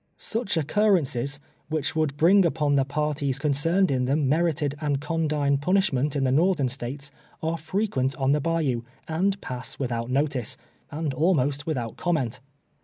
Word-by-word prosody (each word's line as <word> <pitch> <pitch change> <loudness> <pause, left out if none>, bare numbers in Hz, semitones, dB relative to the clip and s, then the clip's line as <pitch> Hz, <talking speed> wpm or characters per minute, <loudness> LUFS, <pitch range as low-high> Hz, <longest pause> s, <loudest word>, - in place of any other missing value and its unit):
Such 225 -6 -2
occurrences, 150 - +1 0.3
which 155 -2 -1
would 155 -3 0
bring 190 +6 +6
upon 150 -4 +1
the 140 -1 +4
parties 145 -1 -1
concerned 155 +6 +2
in 130 -2 +1
them 140 +2 +1
merited 155 -1 +1
and 145 -2 0
condign 150 -2 0
pun 180 +7 +1
ishment 150 -8 +1
in 140 - +1
the 130 - +2
Northern 155 -2 +3
States, 140 +3 -6 0.3
are 160 +1 0
frequent 160 -6 -1
on 135 0 +1
the 150 +1 +2
bayou, 155 -7 0 0.3
and 190 +5 0
pass 125 -1 -6
without 120 -3 -2
notice, 135 -3 0 0.3
and 150 -1 -3
almost 145 -2 +1
without 120 -8 -3
comment. 155 -10 -1
145 Hz, 155 wpm, -25 LUFS, 135-165 Hz, 0.3 s, bring